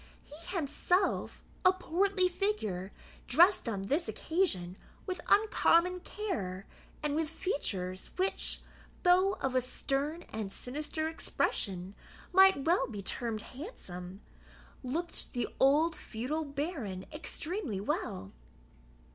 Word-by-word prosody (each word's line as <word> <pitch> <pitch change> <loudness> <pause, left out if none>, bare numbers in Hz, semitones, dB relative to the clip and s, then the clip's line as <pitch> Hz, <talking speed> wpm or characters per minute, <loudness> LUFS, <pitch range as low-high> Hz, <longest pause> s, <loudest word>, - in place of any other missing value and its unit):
He 335 +6 -9
himself, 355 +4 +1 0.2
a 365 - +8
portly 370 +1 +2
figure, 285 - -1 0.4
dressed 345 +1 +5
on 200 -3 -2
this 290 - 0
occasion 195 - 0 0.3
with 370 -1 -3
uncommon 365 -4 +4
care, 210 - -4 0.4
and 300 -1 +1
with 315 0 0
features, 190 - -3
which, 375 +2 0 0.4
though 370 +2 +5
of 265 -7 -2
a 255 - +3
stern 275 +5 -2
and 215 -3 -3
sinister 300 +7 -3
expression, 195 - -1 0.4
might 380 -6 +7
well 330 -5 +3
be 205 -4 -6
termed 225 0 -2
handsome, 190 - -8 0.6
looked 325 +7 -3
the 245 -3 0
old 305 +5 +5
feudal 270 +8 -3
baron 280 - -3
extremely 305 - -3
well. 95 - -2
295 Hz, 110 wpm, -32 LUFS, 215-360 Hz, 0.6 s, a